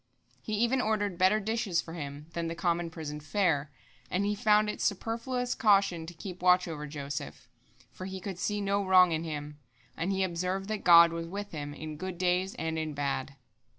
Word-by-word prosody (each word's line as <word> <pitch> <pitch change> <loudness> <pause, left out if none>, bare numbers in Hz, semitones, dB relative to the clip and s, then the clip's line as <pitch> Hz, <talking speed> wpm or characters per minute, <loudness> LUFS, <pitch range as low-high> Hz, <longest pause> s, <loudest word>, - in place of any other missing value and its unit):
He 215 - -5
even 235 +4 +2
ordered 205 -5 -1
better 190 +4 +4
dishes 215 -4 0
for 165 - -5
him 145 -2 -6
than 170 -1 -2
the 165 - -4
common 170 0 0
prison 155 -2 -6
fare, 150 -2 0 0.4
and 190 +2 0
he 205 - +1
found 210 +1 +3
it 210 - -4
superfluous 235 +5 -1
caution 195 -7 +3
to 175 - -8
keep 185 +1 -8
watch 180 0 +4
over 150 -2 -5
Joseph, 140 -1 -6 0.4
for 185 - -8
he 190 0 -6
could 185 -1 -6
see 205 +1 -1
no 200 0 +1
wrong 185 -2 +6
in 160 0 -1
him, 150 -2 -6 0.4
and 175 +4 -1
he 190 0 +1
observed 185 +2 -2
that 215 -1 -3
God 170 -1 +8
was 165 0 -4
with 200 +3 -6
him, 145 -2 -5
in 155 -1 -7
good 185 +2 -5
days 185 +3 +1
and 160 -6 -2
in 155 -2 -3
bad. 140 -1 -2
180 Hz, 195 wpm, -30 LUFS, 160-200 Hz, 0.4 s, God